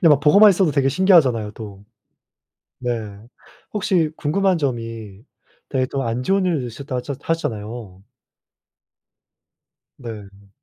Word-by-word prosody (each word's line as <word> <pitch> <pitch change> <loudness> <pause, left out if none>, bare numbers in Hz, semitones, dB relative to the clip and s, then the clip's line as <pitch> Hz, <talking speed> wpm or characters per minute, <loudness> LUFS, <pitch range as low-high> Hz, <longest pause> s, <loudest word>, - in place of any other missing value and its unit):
네. 165 - +7
막 145 -2 +5
보고만 200 +9 +7
있어도 185 -3 +2
되게 140 -2 +2
신기하잖아요 135 - +3
또. 100 -3 -10 1.0
네. 125 - -3 0.8
혹시 185 -6 +1
궁금한 185 +5 +1
점이 115 -7 -4 0.5
되게 130 -2 0
또 135 0 -3
안 115 +2 -2
좋은 195 +5 +1
일이 160 -8 0
있으셨다 130 +3 -7
하셨 130 +2 -5
하셨잖아요. 110 - -4 2.0
네. 100 -5 -10
130 Hz, 255 characters per minute, -21 LUFS, 115-165 Hz, 2.0 s, 네